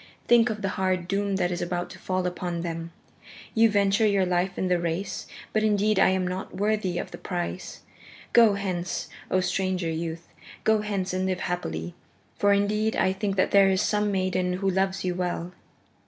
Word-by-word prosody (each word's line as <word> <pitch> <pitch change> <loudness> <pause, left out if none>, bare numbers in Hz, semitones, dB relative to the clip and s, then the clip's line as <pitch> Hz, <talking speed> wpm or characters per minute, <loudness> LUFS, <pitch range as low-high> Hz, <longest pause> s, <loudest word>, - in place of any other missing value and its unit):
Think 240 0 +5
of 215 -1 -4
the 195 - +1
hard 185 -2 0
doom 200 +1 0
that 180 -2 0
is 175 - -3
about 175 0 -3
to - - -11
fall 185 -1 -1
upon 175 -1 -3
them! 165 -1 -4 0.6
You 225 0 +5
venture 200 +1 +3
your 200 -2 +3
life 180 +1 0
in 190 - 0
the 180 -1 +2
race, 170 +3 -3 0.3
but 215 - +2
indeed 210 -1 +2
I - - +6
am 190 -1 +1
not 185 0 -5
worthy 205 -3 0
of - - -4
the - - -9
price. 180 0 -4 0.5
Go 225 -4 +6
hence, 185 -3 -3 0.2
O 185 - +2
stranger 185 -2 -1
youth, 165 +1 -4 0.4
go 220 -1 +3
hence 195 -3 -2
and 185 0 0
live 185 -1 -1
happily, 85 - -3 0.4
for 205 - +3
indeed 210 +2 +2
I 185 - +2
think 195 0 -2
that 185 - +2
there 195 -1 +6
is 190 -1 +2
some 210 -1 +1
maiden 185 -1 0
who 195 +2 0
loves 190 +1 0
you 180 - 0
well." 175 -1 -3
190 Hz, 190 wpm, -26 LUFS, 180-200 Hz, 0.6 s, I